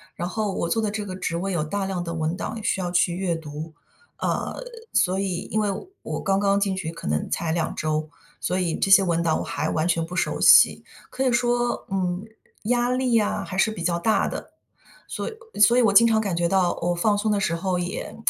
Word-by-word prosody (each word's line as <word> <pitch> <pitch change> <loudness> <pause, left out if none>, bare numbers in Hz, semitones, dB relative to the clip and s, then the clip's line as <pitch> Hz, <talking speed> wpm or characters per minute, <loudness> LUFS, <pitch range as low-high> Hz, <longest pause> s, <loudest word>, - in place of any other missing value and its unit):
然 175 - -3
后 205 +1 -2
我 170 - -2
做 225 +6 +1
的 215 - 0
这 210 0 -4
个 185 -1 -6
职 170 -2 -3
位 190 +3 -2
有 170 -4 0
大 195 +6 -2
量 185 -2 -3
的 170 - -5
文 160 0 -1
档 225 - -4
需 195 - 0
要 180 -1 -2
去 175 -1 +2
阅 180 -2 -1
读。 155 0 -7 0.5
呃， - - -1 0.4
所 185 +1 +2
以 190 -3 -3
因 215 - 0
为 210 - 0 0.3
我 - - -4
刚 195 -1 +1
刚 200 0 +3
进 195 -1 0
去 175 -4 -4
可 165 - -8
能 75 +1 -1
才 165 -2 -1
2 170 -2 -1
周， 155 0 -2 0.3
所 185 +1 0
以 170 -3 0
这 195 - 0
些 195 - +9
文 170 -2 0
档 160 -2 +1
我 - - -3
还 155 - -2
完 160 +2 0
全 165 -1 +1
不 175 - -10
熟 - - -1
悉。 - - +7 0.3
可 260 - -3
以 255 - +3
说， 240 0 0
嗯， 185 -1 -1 0.4
压 240 +2 +1
力 250 -2 +2
啊 205 -2 0
还 185 - -6
是 215 +3 +3
比 210 - -7
较 170 0 0
大 215 +6 +1
的， - - -6 0.6
所 - - -4
以 450 - -13
所 235 +3 +6
以 - - +5
我 220 - +4
经 230 +3 +7
常 220 -1 +3
感 200 -4 -2
觉 170 0 +1
到 185 -1 +2
我 175 +1 0
放 205 +4 +2
松 215 +1 0
的 205 - +1
时 170 -3 0
候 185 +1 -1
也， 175 +1 -4
185 Hz, 250 characters per minute, -24 LUFS, 170-210 Hz, 0.6 s, 些